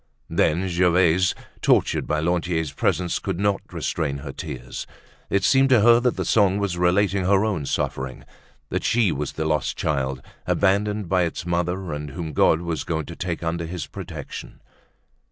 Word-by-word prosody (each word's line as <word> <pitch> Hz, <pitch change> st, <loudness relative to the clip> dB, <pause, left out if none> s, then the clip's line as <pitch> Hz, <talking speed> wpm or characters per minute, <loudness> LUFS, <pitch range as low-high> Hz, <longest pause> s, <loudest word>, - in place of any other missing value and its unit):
Then 90 Hz, +5 st, +2 dB
Gervaise, 90 Hz, 0 st, +3 dB, 0.3 s
tortured -, -, +2 dB
by 75 Hz, 0 st, 0 dB
Lantier's 85 Hz, -2 st, 0 dB
presence, 90 Hz, -2 st, 0 dB
could 95 Hz, -3 st, -3 dB
not 100 Hz, -1 st, +1 dB
restrain 75 Hz, -4 st, -2 dB
her 70 Hz, -, -4 dB
tears; 60 Hz, -1 st, -7 dB, 0.4 s
it 100 Hz, 0 st, +1 dB
seemed 135 Hz, +3 st, +4 dB
to 125 Hz, -5 st, +5 dB
her 120 Hz, +2 st, +7 dB
that 125 Hz, 0 st, +1 dB
the -, -, -1 dB
song 100 Hz, -3 st, +3 dB
was 100 Hz, -3 st, -1 dB
relating 95 Hz, +2 st, +2 dB
her 100 Hz, +2 st, +3 dB
own 85 Hz, -10 st, -2 dB
suffering, 65 Hz, -1 st, -3 dB, 0.5 s
that -, -, -2 dB
she 115 Hz, -6 st, +3 dB
was 75 Hz, -1 st, -3 dB
the 80 Hz, -, -3 dB
lost 75 Hz, -3 st, 0 dB
child, 65 Hz, -3 st, -1 dB, 0.2 s
abandoned 100 Hz, +1 st, +1 dB
by 90 Hz, +1 st, +2 dB
its 85 Hz, -1 st, -2 dB
mother, 90 Hz, 0 st, -1 dB
and 75 Hz, 0 st, -5 dB
whom 80 Hz, +2 st, -5 dB
God 80 Hz, +3 st, +4 dB
was 85 Hz, -2 st, -3 dB
going 80 Hz, -2 st, -2 dB
to 85 Hz, -, -8 dB
take 85 Hz, -1 st, -4 dB
under 85 Hz, 0 st, -2 dB
his 85 Hz, -3 st, -4 dB
protection. 85 Hz, -3 st, -8 dB
85 Hz, 170 wpm, -23 LUFS, 80-95 Hz, 0.5 s, her